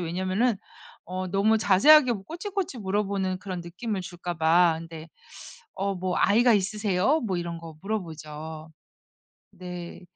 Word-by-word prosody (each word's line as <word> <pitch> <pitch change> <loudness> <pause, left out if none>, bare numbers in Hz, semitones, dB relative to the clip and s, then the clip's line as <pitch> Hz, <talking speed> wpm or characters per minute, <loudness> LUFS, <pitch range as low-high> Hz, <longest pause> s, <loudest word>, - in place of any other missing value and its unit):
왜냐면은 185 +7 0 0.5
어 185 +1 -4
너무 205 +4 +3
자세하게 250 +7 +6
뭐 200 -4 -5
꼬치꼬치 365 - -4
물어보는 195 -2 -1
그런 185 -2 -5
느낌을 190 +4 -4
줄까봐 175 -1 +2
근데 165 -1 -9 0.7
어 200 0 -1
뭐 185 0 -2
"아이가 235 +3 +5
있으세요?" 210 - +1
뭐 195 -6 -2
이런 170 -1 -4
거 165 -2 -11
물어보죠. 160 -5 -6 0.8
네. 180 0 -8
185 Hz, 285 characters per minute, -26 LUFS, 170-215 Hz, 0.8 s, 자세하게